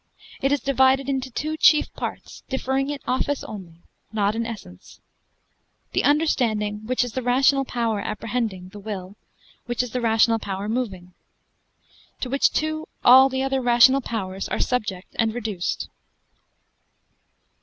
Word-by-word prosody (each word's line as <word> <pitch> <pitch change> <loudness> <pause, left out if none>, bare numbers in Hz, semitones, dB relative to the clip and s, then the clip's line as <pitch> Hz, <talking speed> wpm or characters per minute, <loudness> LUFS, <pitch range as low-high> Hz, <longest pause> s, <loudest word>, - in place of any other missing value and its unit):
It 275 - +1
is 285 - +2
divided 265 0 +3
into 265 -1 -2
two 310 +5 -3
chief 310 -1 +4
parts, - - -6
differing 265 +1 -1
in 290 - -2
office 260 +3 -1
only, 175 -5 -10 0.3
not 210 -1 +1
in 230 +1 -2
essence. 190 - -10 0.9
The - - 0
understanding, 230 -8 +1
which 255 0 +1
is 245 - -5
the 260 - -2
rational 270 +2 +3
power 230 -4 -1
apprehending; 210 -3 -3
the 205 - -11
will, 200 -2 -6 0.5
which 240 +1 0
is 250 - -7
the 250 - -2
rational 225 0 +3
power 195 -1 -4
moving: 195 -7 -3 1.1
to 250 - -4
which 275 - +3
two, 310 0 -2 0.2
all 260 +2 +8
the 265 0 -1
other 270 0 0
rational 245 +2 +5
powers 195 -5 -4
are - - -2
subject 210 -7 -2
and 225 -1 +1
reduced. 210 -7 -3
240 Hz, 145 wpm, -23 LUFS, 210-265 Hz, 1.1 s, all